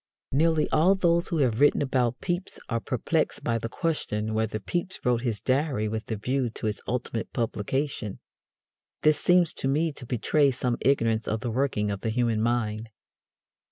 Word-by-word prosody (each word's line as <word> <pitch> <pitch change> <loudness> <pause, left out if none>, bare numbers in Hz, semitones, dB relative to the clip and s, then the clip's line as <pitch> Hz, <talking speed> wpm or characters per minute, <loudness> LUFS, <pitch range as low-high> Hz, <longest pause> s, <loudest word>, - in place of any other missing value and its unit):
Nearly 155 +2 +3
all 175 +6 +4
those 170 -2 +2
who 170 - -1
have 115 -2 -1
written 145 0 +4
about 125 -3 0
Pepys 175 +1 -3
are 115 -1 0
perplexed - - -1
by 115 -1 0
the 115 - -4
question 110 -9 -2
whether 110 0 0
Pepys 175 - -3
wrote 120 -1 +2
his 115 -5 -2
Diary 130 -4 0
with 110 +1 -4
a 110 - -1
view 125 +4 -1
to 110 - -7
its 105 -1 -2
ultimate 115 -1 -3
publication. 115 -1 -2 0.9
This 155 -1 +4
seems 175 -2 +4
to - - -2
me 155 +4 +1
to 135 -4 -10
betray 140 +5 +2
some 125 -2 -1
ignorance 115 -5 +2
of 110 0 -1
the 120 -2 -2
working 110 -5 0
of 100 - -4
the 115 - -1
human 115 -1 +1
mind. 110 -1 -1
125 Hz, 175 wpm, -27 LUFS, 110-145 Hz, 0.9 s, all